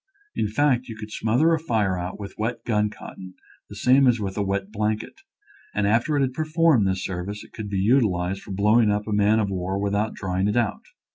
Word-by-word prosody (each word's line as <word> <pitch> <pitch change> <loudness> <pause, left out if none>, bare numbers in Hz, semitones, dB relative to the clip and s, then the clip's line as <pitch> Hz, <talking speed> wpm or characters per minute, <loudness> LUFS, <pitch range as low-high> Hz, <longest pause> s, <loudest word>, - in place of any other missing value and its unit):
In - - 0
fact, 130 +2 +1
you 115 - -7
could 110 -1 -8
smother 125 +11 +2
a 160 - +1
fire 110 - 0
out 90 +2 -5
with 100 -1 -7
wet 115 +2 -3
gun 105 -2 +1
cotton 95 -2 -11 0.3
the 100 - -9
same 130 +5 +4
as 120 -2 +3
with 95 -2 -4
a 105 - -1
wet 100 0 -2
blanket, 110 0 -3 0.5
and 105 - +1
after 120 +8 +2
it - - +2
had 130 -2 0
performed 155 - +2
this 95 0 -1
serv 90 0 -4
ice 105 0 -6
it - - -18
could 105 -2 -6
be 100 - -2
utilized 95 -4 +1
for - - -10
blowing 105 +3 +3
up 105 +1 -1
a 110 - -2
man 105 +1 +3
of 105 -3 0
war 95 +1 -2
without 100 +2 -1
drying 95 0 -1
it 105 - 0
out. 110 -3 0
105 Hz, 225 wpm, -24 LUFS, 100-120 Hz, 0.5 s, same